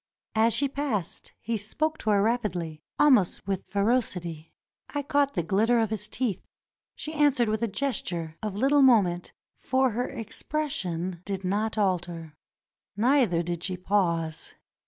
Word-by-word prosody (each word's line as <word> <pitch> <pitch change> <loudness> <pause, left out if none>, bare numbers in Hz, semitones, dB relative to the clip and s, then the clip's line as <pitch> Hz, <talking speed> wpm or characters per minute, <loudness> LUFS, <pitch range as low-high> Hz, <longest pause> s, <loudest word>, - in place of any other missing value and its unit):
As 225 +1 +3
she 280 - +2
passed 265 - -2
he 230 +1 -2
spoke 310 +10 -2
to 215 - -2
her 200 -1 +4
rapidly, 180 -9 -1 0.2
almost 255 -12 +4
with 195 -2 -3
ferocity. 185 -7 -1 0.4
I 290 0 -3
caught 285 -1 +1
the 175 - 0
glitter 215 +8 +2
of 225 -2 +1
his 210 -1 -2
teeth. 230 -8 -2 0.5
She 310 - -6
answered 290 -6 +3
with 215 +1 -1
a 230 - +1
gesture, 180 - -2
of 210 -3 -3
little 275 +6 +4
moment, 200 -10 +4 0.3
for 260 -1 +2
her 245 +3 -2
expression 190 - -3
did 195 -1 -4
not 210 +4 -1
alter, 175 -5 -1 0.6
neither 230 -7 +3
did 170 0 -4
she 185 -1 -2
pause. 170 -4 -1
210 Hz, 145 wpm, -27 LUFS, 180-255 Hz, 0.6 s, her